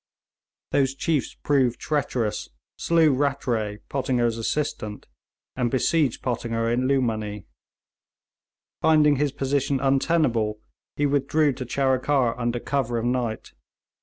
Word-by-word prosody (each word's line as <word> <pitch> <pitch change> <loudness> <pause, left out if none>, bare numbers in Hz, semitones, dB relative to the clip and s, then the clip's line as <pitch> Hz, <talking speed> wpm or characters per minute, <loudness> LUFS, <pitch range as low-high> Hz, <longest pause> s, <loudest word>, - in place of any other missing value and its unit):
Those 135 -1 +2
chiefs 155 -2 -1
proved 130 -4 +2
treacherous, 130 -7 -2 0.3
slew 165 -3 +3
Rattray, 125 -6 -1
Pottinger's 120 -4 0
assistant, 110 -4 -3 0.5
and 125 -2 0
besieged 135 +1 +1
Pottinger 115 -2 -1
in 125 +2 +1
Lughmanee. 110 -7 -1 1.4
Finding 150 -2 +4
his 145 0 +1
position 140 0 0
untenable, 135 -6 +1 0.4
he 145 - +1
withdrew 145 +1 +2
to 130 0 -6
Charikar 130 -1 +1
under 120 0 -1
cover 125 -3 -1
of 115 - -2
night. 120 -3 -2
130 Hz, 105 wpm, -24 LUFS, 115-145 Hz, 1.4 s, Finding